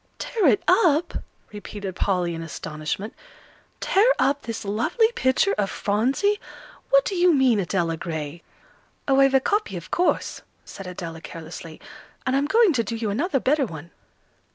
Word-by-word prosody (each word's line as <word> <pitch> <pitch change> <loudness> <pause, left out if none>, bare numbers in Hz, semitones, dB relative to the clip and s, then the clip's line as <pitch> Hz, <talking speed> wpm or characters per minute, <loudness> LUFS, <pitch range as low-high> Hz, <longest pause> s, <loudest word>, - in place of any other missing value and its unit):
"Tear 435 -8 0
it 225 -6 +3
up!" 345 -4 +3 0.4
repeated 205 -2 -7
Polly, 180 -3 0
in 165 - -5
astonishment; 160 +5 -5 0.7
"tear 430 +6 +4
up 275 +2 +1
this 230 -2 -6
lovely 235 - +1
picture 325 - +2
of 195 -1 +1
Phronsie! 265 - 0 0.5
What - - +5
do - - -2
you 360 -1 +4
mean, 255 -5 +4
Adela 175 -3 -1
Gray?" 160 -1 -5 0.7
"Oh, 270 -1 +4
I've 270 0 +5
a - - +7
copy, 415 +10 -1
of - - -10
course," 360 - 0 0.2
said 195 - -9
Adela, 165 -3 -7
carelessly; 165 -1 -9 0.5
"and 260 - +1
I'm 280 +1 +1
going 440 0 +4
to 235 -4 +1
do 225 +2 -4
you 225 -2 -2
another 275 - 0
better 275 +1 +1
one." 160 -2 -9
230 Hz, 155 wpm, -24 LUFS, -, 0.7 s, a